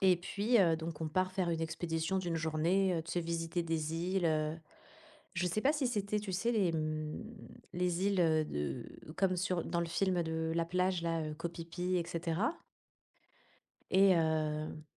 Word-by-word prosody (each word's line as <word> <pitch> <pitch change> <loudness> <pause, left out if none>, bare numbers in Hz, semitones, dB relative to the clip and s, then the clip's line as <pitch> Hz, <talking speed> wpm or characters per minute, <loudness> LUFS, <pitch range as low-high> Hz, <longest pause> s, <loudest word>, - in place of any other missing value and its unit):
Et 185 -2 +5
puis, 205 +7 +1
heu, 165 -3 +4
donc 160 -1 -6
on 160 - -1
part 185 +3 0
faire 185 -3 0
une 165 -1 -1
expédition 165 +2 -1
d'une 175 -3 -1
journée, 165 +4 +2
heu, 165 - -1
tu 165 - -6
sais 175 - +1
visiter 165 +1 -2
des 160 -1 -2
îles, 180 +1 0
heu. 155 0 +1 0.8
Je 175 +1 0
sais 180 +5 0
pas 280 - +4
si 290 -4 0
c'était 210 -3 -1
tu 200 -2 -5
sais, 230 +6 +1
les, 195 -6 +2
mmh, 155 +1 -2 0.5
les 180 +1 +1
îles, 195 -3 +2
heu, 155 -2 +3
de 75 - -3 0.3
comme 185 -2 +2
sur 180 -1 0
dans 170 - -1
le 170 - -1
film 180 +1 +1
de 160 0 -2
La 170 0 +2
plage, 180 0 0
là, 165 -1 0
heu, 155 -1 -4
Koh 165 +2 -3
Phi 165 0 -7
Phi, 180 +1 -1
et 170 -1 0
cetera. 175 - -1 1.4
Et 190 0 +6
heu 155 -1 0
170 Hz, 190 wpm, -34 LUFS, 160-185 Hz, 1.4 s, Et